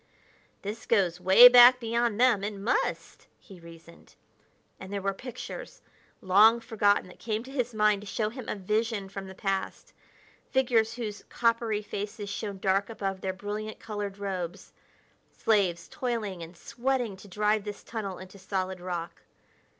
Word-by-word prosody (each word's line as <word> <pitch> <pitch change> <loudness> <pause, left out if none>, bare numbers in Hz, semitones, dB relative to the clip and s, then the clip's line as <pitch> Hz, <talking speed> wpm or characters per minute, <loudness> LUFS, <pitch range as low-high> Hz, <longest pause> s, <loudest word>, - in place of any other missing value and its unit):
"This 210 +3 -6
goes 180 -6 +1
way 190 +7 +10
back 245 0 +8
beyond 235 -1 0
them 240 -6 +4
it 205 0 -3
must," 200 +4 -2
he 190 -5 -15
reasoned. 170 0 -15 0.6
And 190 +1 -9
there 200 - -2
were 195 0 -1
pictures, 255 - -9 0.4
long 210 +5 +6
forgotten, 215 -3 +1
that 180 - -15
came 220 -1 -3
to 265 - -11
his 250 -3 -1
mind 210 -2 +2
to 210 - -11
show 215 +1 -1
him 245 0 -8
a - - -2
vision 210 +1 -1
from 195 0 -7
the 190 - -10
past 195 0 -3 0.6
figures 230 -4 +2
whose 215 -4 -6
coppery 230 -2 0
faces 205 0 -5
shone 205 -2 -5
dark 195 +2 +1
above 195 -4 -4
their 190 - -1
brilliant, 210 +3 -6
colored 205 -2 -5
robes 190 -2 -5 0.6
slaves, 190 -6 +1
toiling 225 - -3
and 165 +1 -10
sweating 245 -1 -2
to 195 - -14
drive 210 +2 0
this 205 -1 -7
tunnel 200 -5 -5
into 190 +1 -12
solid 190 -1 -3
rock. 175 -2 -5
205 Hz, 155 wpm, -28 LUFS, 190-230 Hz, 0.6 s, way